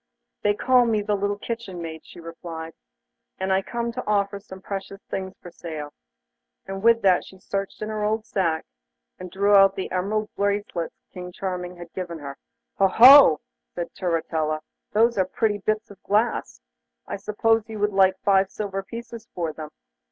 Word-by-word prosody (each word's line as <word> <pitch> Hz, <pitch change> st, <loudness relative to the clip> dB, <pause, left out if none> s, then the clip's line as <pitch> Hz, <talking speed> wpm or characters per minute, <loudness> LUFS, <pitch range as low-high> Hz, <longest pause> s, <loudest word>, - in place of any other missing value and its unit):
'They 205 Hz, 0 st, +2 dB
call 250 Hz, +3 st, +4 dB
me 215 Hz, -2 st, +1 dB
the 210 Hz, -, 0 dB
little 205 Hz, 0 st, -1 dB
kitchen 220 Hz, -4 st, -5 dB
maid,' 160 Hz, -1 st, -7 dB
she -, -, -14 dB
replied, 165 Hz, -1 st, -8 dB, 0.6 s
'and 190 Hz, 0 st, 0 dB
I 190 Hz, -, +3 dB
come 235 Hz, +3 st, -3 dB
to -, -, -5 dB
offer 200 Hz, -1 st, +1 dB
some 190 Hz, -1 st, -11 dB
precious 195 Hz, 0 st, -6 dB
things 190 Hz, 0 st, -4 dB
for 175 Hz, -, -11 dB
sale,' 155 Hz, -4 st, -7 dB, 0.7 s
and 195 Hz, 0 st, -6 dB
with 230 Hz, 0 st, +4 dB
that 185 Hz, -2 st, +4 dB
she 190 Hz, -, -14 dB
searched 195 Hz, +2 st, -4 dB
in 215 Hz, -, -4 dB
her 215 Hz, -1 st, -2 dB
old 215 Hz, +1 st, 0 dB
sack, 165 Hz, -7 st, -1 dB, 0.5 s
and 185 Hz, 0 st, -7 dB
drew 200 Hz, +3 st, +2 dB
out 195 Hz, -1 st, +7 dB
the 190 Hz, -, -4 dB
emerald 210 Hz, +4 st, -1 dB
bracelets 200 Hz, -4 st, -1 dB, 0.2 s
King 180 Hz, 0 st, -7 dB
Charming 180 Hz, -1 st, -4 dB
had 175 Hz, -1 st, -11 dB
given 175 Hz, -3 st, -5 dB
her. 140 Hz, -2 st, -7 dB, 0.4 s
'Ho, 195 Hz, -, +6 dB
ho!' 245 Hz, -, +9 dB, 0.3 s
said 175 Hz, -1 st, -4 dB
Turritella, 160 Hz, -3 st, -1 dB, 0.3 s
those 230 Hz, 0 st, +3 dB
are 190 Hz, -, +3 dB
pretty 205 Hz, +2 st, 0 dB
bits 215 Hz, +2 st, -2 dB
of 200 Hz, -1 st, -15 dB
glass. 210 Hz, -, 0 dB, 0.4 s
I -, -, -5 dB
suppose 220 Hz, +2 st, +1 dB
you 220 Hz, -, -6 dB
would 210 Hz, 0 st, 0 dB
like 190 Hz, -1 st, +4 dB
five 195 Hz, -1 st, +4 dB
silver 195 Hz, -2 st, -4 dB
pieces 230 Hz, +2 st, -9 dB
for 165 Hz, -3 st, -2 dB
them. 155 Hz, -1 st, -8 dB
195 Hz, 175 wpm, -24 LUFS, 180-210 Hz, 0.7 s, ho